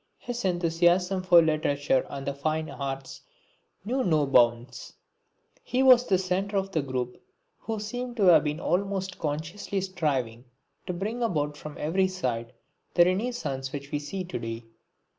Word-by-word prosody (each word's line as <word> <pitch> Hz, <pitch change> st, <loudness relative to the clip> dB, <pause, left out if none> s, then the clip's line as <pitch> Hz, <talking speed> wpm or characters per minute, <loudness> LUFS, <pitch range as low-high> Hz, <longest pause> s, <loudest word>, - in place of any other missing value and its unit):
His 245 Hz, 0 st, -5 dB
enthusiasm 175 Hz, +1 st, +2 dB
for 175 Hz, -2 st, +6 dB
literature 145 Hz, -4 st, +1 dB
and 135 Hz, -1 st, -6 dB
the 140 Hz, -, -1 dB
fine 155 Hz, +2 st, -2 dB
arts 135 Hz, -1 st, -5 dB, 0.6 s
knew 255 Hz, +4 st, 0 dB
no 155 Hz, -7 st, +2 dB
bounds. 120 Hz, -1 st, +2 dB, 0.7 s
He 255 Hz, +1 st, 0 dB
was 250 Hz, -2 st, +7 dB
the 190 Hz, -, +3 dB
centre 190 Hz, +2 st, -1 dB
of 195 Hz, 0 st, -1 dB
the 160 Hz, -, +1 dB
group 130 Hz, -2 st, -4 dB, 0.4 s
who 220 Hz, -1 st, -4 dB
seem 245 Hz, +3 st, -5 dB
to 215 Hz, -, 0 dB
have 170 Hz, -5 st, +7 dB
been 150 Hz, +1 st, -2 dB
almost 190 Hz, 0 st, -1 dB
consciously 160 Hz, +7 st, -3 dB
striving 140 Hz, -11 st, -2 dB, 0.4 s
to 180 Hz, -, -2 dB
bring 215 Hz, +7 st, -3 dB
about 150 Hz, -10 st, 0 dB
from 150 Hz, 0 st, -9 dB
every 185 Hz, +5 st, +1 dB
side 125 Hz, -11 st, -3 dB, 0.4 s
the 175 Hz, -, +7 dB
renascence 185 Hz, -, -2 dB
which 140 Hz, 0 st, -7 dB
we 145 Hz, -, -1 dB
see 185 Hz, +6 st, -5 dB
to 180 Hz, -7 st, -5 dB
day. 115 Hz, 0 st, -5 dB
165 Hz, 155 wpm, -27 LUFS, 140-195 Hz, 0.7 s, was